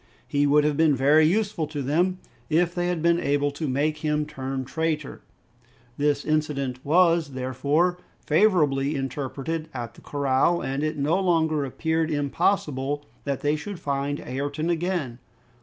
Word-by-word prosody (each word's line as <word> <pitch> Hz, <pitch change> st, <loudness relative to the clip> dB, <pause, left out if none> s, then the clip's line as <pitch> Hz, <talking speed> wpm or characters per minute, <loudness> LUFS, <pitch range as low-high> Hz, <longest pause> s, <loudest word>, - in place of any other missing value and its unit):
He 145 Hz, 0 st, +2 dB
would 150 Hz, +1 st, +4 dB
have 150 Hz, -1 st, +1 dB
been 160 Hz, -3 st, +4 dB
very 150 Hz, +4 st, +5 dB
useful 200 Hz, -3 st, 0 dB
to 145 Hz, -2 st, -4 dB
them, 175 Hz, +7 st, +1 dB, 0.3 s
if 170 Hz, +2 st, +2 dB
they 175 Hz, 0 st, -1 dB
had 175 Hz, -3 st, -1 dB
been 170 Hz, 0 st, +4 dB
able 145 Hz, -1 st, +1 dB
to 150 Hz, +2 st, -4 dB
make 145 Hz, +4 st, 0 dB
him 150 Hz, -1 st, 0 dB
turn 135 Hz, -3 st, -4 dB
traitor! 155 Hz, 0 st, -2 dB, 0.7 s
This 145 Hz, 0 st, 0 dB
incident 140 Hz, -4 st, -1 dB
was, 165 Hz, -2 st, +3 dB
therefore, 140 Hz, +8 st, 0 dB, 0.3 s
favorably 150 Hz, -6 st, +3 dB
interpreted 140 Hz, +4 st, -4 dB
at 120 Hz, -2 st, -5 dB
the -, -, -17 dB
corral, 140 Hz, +4 st, +1 dB
and 135 Hz, +1 st, -3 dB
it 155 Hz, 0 st, -1 dB
no 150 Hz, +6 st, +1 dB
longer 160 Hz, -5 st, +2 dB
appeared 160 Hz, +4 st, -1 dB
impossible 145 Hz, -1 st, 0 dB, 0.2 s
that 140 Hz, -2 st, -2 dB
they 145 Hz, +1 st, +1 dB
should 175 Hz, +5 st, -6 dB
find 140 Hz, 0 st, -2 dB
Ayrton 145 Hz, +5 st, -2 dB
again. 170 Hz, -8 st, -2 dB
150 Hz, 150 wpm, -25 LUFS, 140-165 Hz, 0.7 s, very